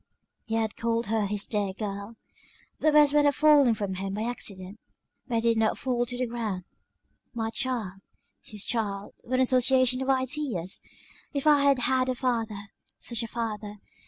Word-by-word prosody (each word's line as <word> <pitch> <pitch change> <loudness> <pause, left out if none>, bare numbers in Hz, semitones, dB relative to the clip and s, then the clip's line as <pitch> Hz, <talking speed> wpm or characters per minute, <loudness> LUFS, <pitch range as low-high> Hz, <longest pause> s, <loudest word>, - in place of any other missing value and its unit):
He 225 - -2
had 220 -2 -1
called 230 0 0
her 220 -2 +1
his 205 0 0
dear 205 -3 -1
girl; 200 +2 -6 0.6
the 310 - +3
words 295 -1 +5
might 295 -1 +4
have 285 -1 +3
fallen 290 -6 +5
from 200 -3 -3
him 195 +1 -4
by 215 - -2
accident; 200 -4 -4 0.5
but 245 - -2
they 225 - +2
did 230 -1 +2
not 220 -1 +1
fall 245 -2 -1
to 245 +1 -3
the 250 - 0
ground. 225 -6 -4 0.7
My 225 -1 -2
child! 225 -8 -2 0.4
His 210 -2 -3
child, 205 -4 -2
what 255 - -3
an 255 - +3
association 255 0 +3
of 265 - -2
ideas! 260 - -1 0.5
If 280 - -1
I 295 -2 +6
had 280 -1 +5
had 255 +1 +1
a 255 - 0
father, 225 -5 -2 0.3
such 235 -1 -3
a 230 - -3
father! 215 -2 -4
230 Hz, 180 wpm, -27 LUFS, 210-255 Hz, 0.7 s, I